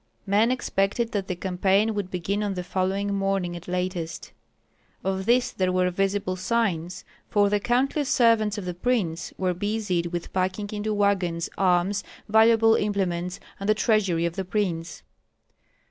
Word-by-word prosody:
Men 210 +3 +3
expected 230 -2 0
that 200 -3 -2
the 180 - -2
campaign 190 +4 +1
would 205 -3 -3
begin 190 +3 -2
on 205 -2 -2
the 180 - -3
following 190 +2 -1
morning 195 -3 -1
at 175 0 -9
latest; 180 -2 -3 0.7
of 190 0 -2
this 245 +1 +3
there 185 -1 0
were 180 0 +2
visible 195 0 0
signs, 185 -4 -1 0.2
for 205 -1 +3
the 205 - +2
countless 260 +6 0
servants 225 -4 +3
of 200 - -5
the 180 - -3
prince 180 -4 -1
were 185 -1 0
busied 205 -2 -1
with 170 0 -5
packing 190 +2 -1
into 210 +1 -2
wagons 190 -5 0
arms, 190 +1 +2 0.2
valuable 225 +1 +5
implements, 185 -4 -1 0.2
and 195 +1 -3
the 215 - +5
treasury 200 -7 +2
of 170 0 -2
the 190 - -2
prince. 180 -4 -2
195 Hz, 155 wpm, -25 LUFS, 180-210 Hz, 0.7 s, valuable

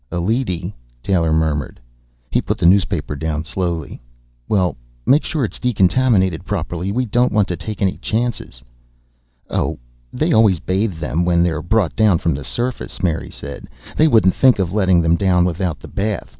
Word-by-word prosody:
"A 90 - -2
leady," 100 -1 -1 0.3
Taylor 85 -4 +1
murmured. 80 -3 -1 0.5
He - - +2
put - - -2
the - - -1
newspaper 90 -5 +2 0.3
slowly 85 -3 -3
down. - - -10 0.5
"Well, 95 -6 +1 0.3
make 145 +3 +4
sure 155 -6 -1
it's - - -7
decontaminated 100 -5 +2
properly. 90 -1 -3
We 125 +4 0
don't 120 +3 +1
want 105 -2 +2
to 90 - -1
take 100 +4 -5
any 95 - 0
chances." 110 - -3 0.8
"Oh, - - -1 0.3
they - - 0
always 105 -6 +4
bathe 95 +2 -1
them 80 +1 -1
when 85 -1 +3
they're 80 -3 0
brought 100 +1 0
down 105 -5 +4
from 85 -1 0
the 70 +1 -5
surface," 120 - -4
Mary 80 -3 -1
said. 70 +1 -9 0.3
"They 155 - +4
wouldn't 110 - +4
think 130 -3 +4
of 95 -2 -1
letting 95 -4 +3
them 80 +1 +3
down 90 -2 +3
without 90 -2 -2
the - - -11
bath. 100 - -3
95 Hz, 170 wpm, -19 LUFS, 85-110 Hz, 0.8 s, make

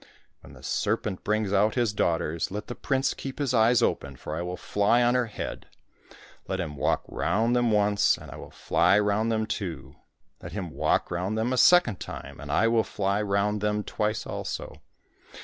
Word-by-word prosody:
When - - -15
the - - -15
serpent 110 -4 -1
brings 105 -1 0
out 105 +2 +3
his 120 -4 +1
daughters, 85 -4 0
let 105 +2 -5
the 120 - -6
prince 135 +1 0
keep 135 -1 -7
his 140 -4 -1
eyes 115 +1 +4
open, 70 -9 -1
for 75 - -6
I 85 - -3
will 90 +1 -4
fly 105 +4 +2
on 120 0 +3
her 125 -2 +1
head. 105 - -6 0.8
Let 95 - -2
him 80 -5 -4
walk 65 - 0
round 115 +4 0
them 120 -1 +2
once, 105 -1 +3
and - - -11
I - - -8
will - - -10
fly 100 - +2
round 105 +2 +1
them 110 -1 0
too. 100 -5 -5 0.4
Let - - -8
him 95 -5 -4
walk - - 0
round 90 +5 -2
them 115 +3 0
a - - +1
second 150 - +5
time, - - -8
and 75 -1 -6
I 95 +10 +3
will 115 -1 +3
fly 100 +1 -1
round 105 0 0
them 105 0 0
twice 105 +1 -2
also. - - -6
105 Hz, 195 wpm, -27 LUFS, 95-115 Hz, 0.8 s, second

